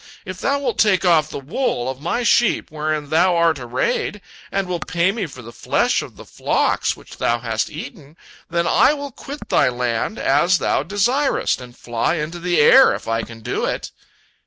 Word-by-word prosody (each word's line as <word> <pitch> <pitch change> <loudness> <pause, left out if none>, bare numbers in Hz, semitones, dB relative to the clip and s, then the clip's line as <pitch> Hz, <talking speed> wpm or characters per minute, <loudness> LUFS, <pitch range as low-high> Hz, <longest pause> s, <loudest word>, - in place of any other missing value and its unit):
If 185 0 -7
thou 280 - +1
wilt 280 - -3
take 195 -4 +3
off 160 -4 +4
the - - -6
wool 135 - -2
of 130 +1 -5
my 175 +10 -1
sheep 235 -6 +2
wherein 155 -1 -3
thou 175 +3 +3
art 165 -3 +2
arrayed, 125 - -2 0.3
and 195 -1 -1
wilt 180 -2 -4
pay 170 +2 +1
me 200 -3 -3
for 130 -4 -12
the 115 - -10
flesh - - +1
of - - -10
the - - -12
flocks - - 0
which - - -14
thou 120 - +1
hast 115 -2 -2
eaten, 155 - -10 0.3
then 170 0 0
I 270 - +4
will 285 -1 -6
quit 285 +4 -9
thy - - +3
land 120 - -2
as 170 +7 +3
thou - - 0
desirest, 235 - 0
and 125 0 -12
fly 120 +7 -1
into 165 +2 -4
the 175 0 0
air, 265 - +7
if - - -9
I 115 0 0
can 115 0 -10
do - - -2
it." - - -3
170 Hz, 195 wpm, -20 LUFS, 130-195 Hz, 0.3 s, air